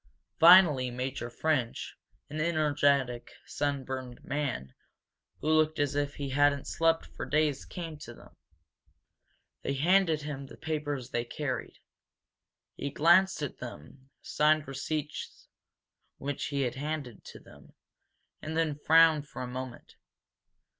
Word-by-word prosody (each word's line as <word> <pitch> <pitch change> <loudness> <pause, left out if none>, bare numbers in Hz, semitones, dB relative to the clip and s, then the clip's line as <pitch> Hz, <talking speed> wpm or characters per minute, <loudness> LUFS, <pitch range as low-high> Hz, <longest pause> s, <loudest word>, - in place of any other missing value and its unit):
Finally 165 -7 +7
Major 125 0 -4
French, 130 -3 -1 0.3
an 155 +1 -4
energetic, 145 -6 +1 0.2
sunburned 130 -3 -4
man, 140 - -3 0.7
who - - -4
looked 155 0 +3
as 145 -1 0
if 145 0 -1
he 140 -1 -4
hadn't 140 +1 +2
slept 165 0 +1
for - - -5
days, 150 -2 0
came 165 -3 -7
to - - -10
them. - - -17 1.3
They 140 - -2
handed 165 +1 +3
him 140 -2 -6
the - - -13
papers 145 -5 -4
they 120 - -1
carried. 130 +4 -4 1.0
He 140 - -4
glanced 170 +3 +4
at 140 - -5
them, 130 - -10
signed 155 0 +2
receipts 150 +2 -5 0.7
which 140 0 -4
he 140 -1 -1
handed 135 -1 -4
to - - -11
them, - - -17 0.7
and 155 +1 -4
then 160 -2 +1
frowned 160 -1 +5
for 130 - -7
a - - -4
moment. 125 -1 -8
145 Hz, 125 wpm, -29 LUFS, 130-155 Hz, 1.3 s, Finally